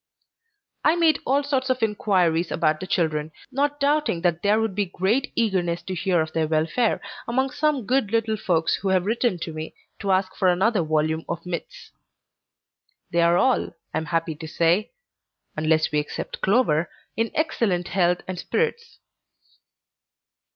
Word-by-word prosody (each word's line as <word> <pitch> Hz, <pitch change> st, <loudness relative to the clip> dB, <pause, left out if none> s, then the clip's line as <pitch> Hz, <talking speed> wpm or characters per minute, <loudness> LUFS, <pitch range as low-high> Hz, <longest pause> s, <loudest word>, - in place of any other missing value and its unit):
I 315 Hz, -, +4 dB
made 325 Hz, -4 st, +3 dB
all 275 Hz, +3 st, +2 dB
sorts 270 Hz, -2 st, -1 dB
of 255 Hz, -2 st, 0 dB
inquiries 180 Hz, -6 st, +1 dB
about 155 Hz, -1 st, +1 dB
the 185 Hz, -, -6 dB
children, 155 Hz, -3 st, 0 dB, 0.2 s
not 290 Hz, +2 st, 0 dB
doubting 290 Hz, -, +1 dB
that 175 Hz, -1 st, +1 dB
there 205 Hz, +2 st, +3 dB
would 225 Hz, -3 st, -1 dB
be 200 Hz, 0 st, -1 dB
great 205 Hz, +10 st, 0 dB
eagerness 180 Hz, -6 st, 0 dB
to 185 Hz, -, -5 dB
hear 180 Hz, -1 st, +1 dB
of 155 Hz, 0 st, -4 dB
their 160 Hz, -1 st, +1 dB
welfare, 160 Hz, +9 st, +1 dB, 0.3 s
among 260 Hz, +3 st, 0 dB
some 295 Hz, -6 st, 0 dB
good 255 Hz, -3 st, +1 dB
little 225 Hz, -1 st, +1 dB
folks 170 Hz, -5 st, +1 dB
who 200 Hz, -, -4 dB
have 185 Hz, -1 st, +2 dB
written 230 Hz, -2 st, +1 dB
to 165 Hz, -1 st, -6 dB
me, 155 Hz, 0 st, -6 dB, 0.2 s
to 200 Hz, -, -4 dB
ask 185 Hz, 0 st, +1 dB
for 190 Hz, -, +1 dB
another 190 Hz, +3 st, +3 dB
volume 155 Hz, 0 st, 0 dB
of 170 Hz, 0 st, -4 dB
myths. 175 Hz, -2 st, -6 dB, 1.2 s
They 170 Hz, -, +2 dB
are 170 Hz, +1 st, +4 dB
all, 260 Hz, -4 st, +1 dB, 0.2 s
I -, -, 0 dB
am 160 Hz, -, -5 dB
happy 165 Hz, +1 st, -1 dB
to 160 Hz, 0 st, -7 dB
say 170 Hz, +6 st, +2 dB, 0.7 s
(unless 155 Hz, 0 st, +2 dB
we 150 Hz, -, +2 dB
except 150 Hz, -, -5 dB
Clover), 180 Hz, -7 st, +2 dB, 0.3 s
in 225 Hz, 0 st, 0 dB
excellent 200 Hz, -, 0 dB
health 175 Hz, -1 st, +2 dB
and 185 Hz, -1 st, -4 dB
spirits. 465 Hz, -, -2 dB
185 Hz, 165 wpm, -24 LUFS, 165-235 Hz, 1.2 s, I